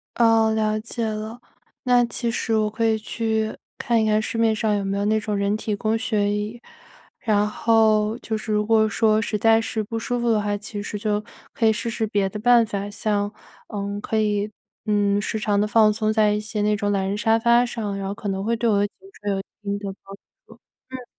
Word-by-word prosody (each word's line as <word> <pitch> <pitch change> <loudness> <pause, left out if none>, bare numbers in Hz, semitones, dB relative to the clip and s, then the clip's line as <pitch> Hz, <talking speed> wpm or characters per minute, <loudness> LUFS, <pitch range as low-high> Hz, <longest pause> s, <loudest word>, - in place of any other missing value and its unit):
哦， 225 -1 +4
了 215 -1 0
解 230 +1 -4
了。 220 +2 -4 0.4
那 245 -1 +4
其 235 0 -3
实 225 -1 -1
我 215 -1 +2
可 225 +2 -1
以 220 -1 +3
去 220 0 -2 0.2
看 235 -4 +1
一 - - +1
看 215 0 +3
市 225 - -4
面 225 -1 +3
上 215 -1 +1
有 200 - -1
没 195 0 -2
有 200 - -1
那 220 +1 +2
种 210 -1 -3
人 200 +1 +1
体 215 -1 -2
工 215 +2 0
学 205 -2 0
椅。 210 +3 -3 0.6
然 210 -2 +2
后， 220 0 +2
就 220 -1 -3
是 215 0 -4
如 210 0 +1
果 220 0 +4
说 215 +1 +2
实 210 0 -2
在 225 +1 +4
是 225 -1 -2
不 225 +2 -4
舒 245 +2 -2
服 240 0 0
的 215 - +2
话， 205 0 -1
其 205 0 -6
实 210 - -5
就 210 0 -1 0.3
可 225 - +2
以 220 - +4
试 230 - -3
试 225 -1 -2
别 200 -2 0
的 210 - -6
办 240 +1 +5
法， 200 -1 -4
像 205 0 -1 0.4
嗯 200 0 -4
可 220 +1 -2
以 210 -1 +1 0.4
嗯 205 -1 +2
时 220 - -2
常 210 -1 +1
地 210 - +2
放 215 0 +5
松 215 0 0
在 215 -1 +3
一 210 - 0
些 215 0 -4
那 210 0 +2
种 205 -1 -1
懒 195 -1 0
人 200 +2 -2
沙 225 +1 +3
发 235 +1 +4
上， 215 -5 -4
然 195 -1 -4
后 200 - -4
可 205 - -5
能 190 0 -2
会 230 +2 0
对 230 +1 0
我 205 - +3
的 205 - +2
颈 - - -37 0.2
椎 205 - -6
有 195 - -1
一 195 - -5 0.2
定 200 0 -2
的 200 -1 -5
帮 195 - -9
助 - - -30 0.7
嗯。 255 -1 -7
215 Hz, 255 characters per minute, -23 LUFS, 205-225 Hz, 0.7 s, 办